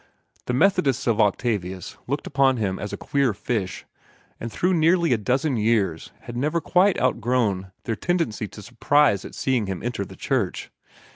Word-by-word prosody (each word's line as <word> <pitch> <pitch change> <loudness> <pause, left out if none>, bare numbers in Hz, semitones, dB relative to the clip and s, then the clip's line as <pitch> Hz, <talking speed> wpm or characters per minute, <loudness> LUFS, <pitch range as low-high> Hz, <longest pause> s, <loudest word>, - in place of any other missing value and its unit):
The 125 - 0
Methodists 180 - +2
of 115 -2 +2
Octavius 100 -3 -1
looked 140 +4 -2
upon 135 -2 +2
him 95 -4 -2
as 105 - -5
a - - -4
queer 140 -7 0
fish, 100 -3 -3 0.5
and 115 - -5
through 180 +9 +1
nearly 170 -2 +3
a - - +2
dozen 130 +5 0
years 105 -7 0
had 120 - -9
never 150 +7 0
quite 180 +4 +3
outgrown 115 -6 0
their 115 - -2
hebdomadal - - -25
tendency 165 - -1
to 105 - -12
surprise 145 -1 +2
at - - -9
seeing 125 -6 0
him 95 -2 -4
enter 120 -4 -2
their 95 0 -11
church. 130 -10 -2
120 Hz, 170 wpm, -24 LUFS, 105-140 Hz, 0.5 s, nearly